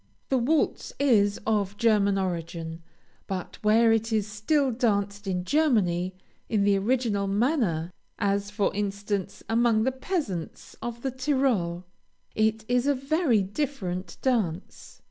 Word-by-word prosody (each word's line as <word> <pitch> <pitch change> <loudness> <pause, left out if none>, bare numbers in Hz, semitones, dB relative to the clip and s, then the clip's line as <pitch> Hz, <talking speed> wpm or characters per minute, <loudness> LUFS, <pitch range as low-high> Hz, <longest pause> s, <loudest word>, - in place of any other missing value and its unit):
The 265 - +3
waltz 295 +6 0
is 210 -8 +3
of 205 -2 0
German 205 -3 +3
origin, 165 -3 -3 0.5
but 185 -2 -5
where 225 +2 +5
it 225 +1 +1
is 215 -2 +1
still 255 +7 +1
danced 205 -4 0
in 180 -2 -1
Germany 190 - +2 0.3
in 215 -3 +2
the 200 0 +4
original 215 -2 0
manner, 200 - +1 0.3
(as, 200 0 0
for 205 -1 0
instance, 200 -1 -3
among 225 -1 +3
the 260 - +2
peasants 260 - -4
of 235 0 -5
the 265 - -1
Tyrol,) 255 -10 0 0.5
it 220 0 +1
is 245 +2 +1
a 285 - +3
very 275 - +2
different 190 -5 -4
dance. 205 -9 -2
215 Hz, 130 wpm, -27 LUFS, 195-250 Hz, 0.5 s, where